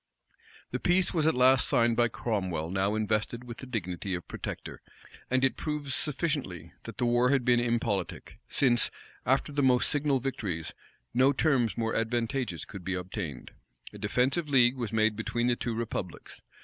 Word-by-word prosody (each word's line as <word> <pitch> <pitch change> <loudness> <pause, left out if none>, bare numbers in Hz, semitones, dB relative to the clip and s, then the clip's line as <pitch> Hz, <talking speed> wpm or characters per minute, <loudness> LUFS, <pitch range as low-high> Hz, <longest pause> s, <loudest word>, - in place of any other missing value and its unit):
The - - -2
peace 180 +1 +3
was 160 -3 +2
at 160 - +3
last 130 0 +5
signed 115 -1 +3
by 120 0 +4
Cromwell 95 -9 -2
now 95 +2 +1
invested 110 +2 -1
with 120 -2 -8
the 130 - -8
dignity 95 -5 -3
of 85 - -7
protector, - - -6 0.5
and 130 +1 +2
it 135 - +3
proves 150 -3 -3
sufficiently, 145 - -2
that - - -8
the 125 - +1
war 120 +1 +3
had 135 -3 +2
been 120 -1 +4
impolitic, 115 -5 -2
since, 120 -3 +2 0.4
after 135 +3 +2
the 145 0 0
most 125 -2 +4
signal 145 -2 +1
victories, 100 -11 -3 0.4
no 130 +3 +4
terms 130 -6 +1
more 115 -1 0
advantageous 115 - -1
could 100 -3 -9
be 95 +1 -2
obtained. 90 - -5 0.4
A 105 - -10
defensive 130 +9 +1
league 125 -2 +5
was 120 -5 -4
made 110 -1 +2
between 120 +2 -1
the 120 0 +3
two 120 -1 -3
republics. 110 -6 -5
120 Hz, 170 wpm, -29 LUFS, 105-130 Hz, 0.5 s, last